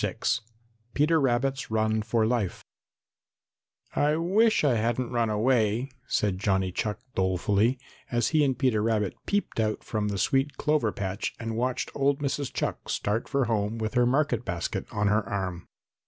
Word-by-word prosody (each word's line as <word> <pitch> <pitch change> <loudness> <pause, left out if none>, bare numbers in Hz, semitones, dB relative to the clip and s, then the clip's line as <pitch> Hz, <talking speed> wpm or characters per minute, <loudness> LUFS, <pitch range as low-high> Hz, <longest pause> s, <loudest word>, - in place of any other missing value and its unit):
VI - - -1 0.8
PETER 155 +2 +3
RABBIT'S 135 +1 0
RUN 110 0 +1
FOR 110 +1 +1
LIFE 110 -5 -1 1.3
"I 150 +1 +3
wish 200 +7 +3
I 140 -4 +4
hadn't 120 +2 0
run 120 -2 +1
away," 115 +2 +1 0.2
said 100 -3 0
Johnny 95 -2 +1
Chuck 105 +3 -2
dolefully, 100 +6 +1 0.3
as 120 -1 +1
he 155 -2 +3
and 135 -3 +1
Peter 125 -5 +2
Rabbit 105 -3 +1
peeped 205 - -1
out 110 -1 0
from 105 -2 -2
the 100 -1 -2
sweet 135 +9 +1
clover 150 -8 +1
patch 95 -1 -3
and 115 -1 -4
watched 125 +2 -1
old 140 0 +2
Mrs. 140 -1 -2
Chuck - - -3
start 105 +3 -1
for 140 -2 +1
home 110 -1 -1
with 110 -1 -3
her 125 -1 +3
market 130 -3 +1
basket 85 -7 -3
on 105 - -1
her 105 +2 +3
arm. 90 -3 -3
115 Hz, 160 wpm, -27 LUFS, 105-135 Hz, 1.3 s, I